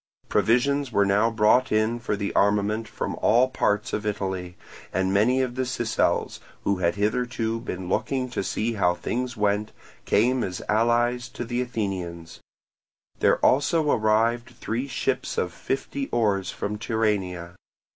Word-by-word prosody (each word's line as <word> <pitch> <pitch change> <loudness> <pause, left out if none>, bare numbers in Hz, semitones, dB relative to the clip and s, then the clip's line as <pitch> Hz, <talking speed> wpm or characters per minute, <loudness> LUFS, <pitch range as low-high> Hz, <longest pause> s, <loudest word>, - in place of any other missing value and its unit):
Provisions 140 +3 +2
were 100 -2 +3
now 105 +3 +3
brought 115 +3 +3
in 110 +2 +1
for 110 -3 -2
the 100 0 -3
armament 105 +2 +2
from - - -4
all 120 +4 +4
parts 105 -5 0
of 105 - -1
Italy; 95 -4 -3 0.3
and 95 0 0
many 125 +6 +3
of 125 -2 -3
the 130 - -2
Sicels, 120 -3 0 0.2
who 100 - +1
had 85 -2 +1
hitherto 115 +2 -1
been 95 -6 -6
looking 125 +7 -1
to 125 - -2
see 115 +4 -1
how 90 -4 +2
things 125 +5 -3
went, 105 +1 0 0.3
came 125 +4 +2
as 90 -2 -4
allies 120 +2 +2
to 120 0 -6
the 120 +1 -1
Athenians: 95 -8 -4 0.8
there - - +4
also 150 +2 +3
arrived 115 +2 +2
three 120 +5 -2
ships 130 0 -2
of 90 -1 -1
fifty 135 +5 -3
oars 105 -5 0
from 105 +1 -4
Tyrrhenia. 100 -6 -1
110 Hz, 145 wpm, -25 LUFS, 100-120 Hz, 0.8 s, all